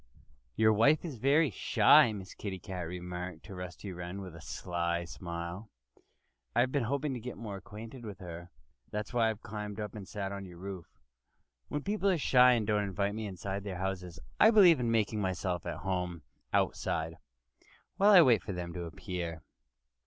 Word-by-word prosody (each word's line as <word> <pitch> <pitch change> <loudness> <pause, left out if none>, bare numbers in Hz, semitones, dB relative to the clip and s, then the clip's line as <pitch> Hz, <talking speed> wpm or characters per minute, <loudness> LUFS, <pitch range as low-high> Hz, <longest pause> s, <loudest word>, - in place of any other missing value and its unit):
"Your 110 0 +5
wife 140 +10 +4
is 150 -7 -5
very 140 +5 +3
shy," 115 - +5
Miss 95 -3 -7
Kitty 95 -3 -5
remarked 90 0 -5
to 100 - -10
Rusty 90 +2 -7
Wren 90 +2 -6
with 90 -4 -8
a 80 - -11
sly 85 +3 -2
smile. 85 +4 -6 0.9
"I've 125 +2 +3
been 140 -4 +1
hoping 140 +3 -1
to 125 - -4
get 125 +2 -7
more 105 -4 -6
acquainted 110 +5 -10
with 105 -4 -7
her. 85 -1 -8 0.4
That's 105 +3 -4
why 115 -2 +3
I - - 0
climbed 105 0 -6
up 105 -1 -4
and 100 -3 -8
sat 100 -2 -4
on 100 0 -5
your 90 -1 -12
roof. 95 -1 -7 0.8
When 145 -1 -3
people 200 -1 +1
are 185 - +3
shy 125 -3 +6
and 115 -3 +1
don't 105 -1 +2
invite 100 0 -1
me 110 0 -4
inside 95 +1 -4
their 95 -3 -5
houses 90 -3 -4 0.2
I 220 - +8
believe 190 - +7
in 120 -1 0
making 110 -1 +1
myself 90 -2 -2
at - - -3
home 90 -3 -2 0.3
outside, 80 0 0 0.8
while 200 +1 +5
I 190 -5 +9
wait 120 - +5
for 100 - -5
them 90 -1 -5
to 90 -1 -4
appear." 85 -1 -5
100 Hz, 180 wpm, -31 LUFS, 90-115 Hz, 0.9 s, I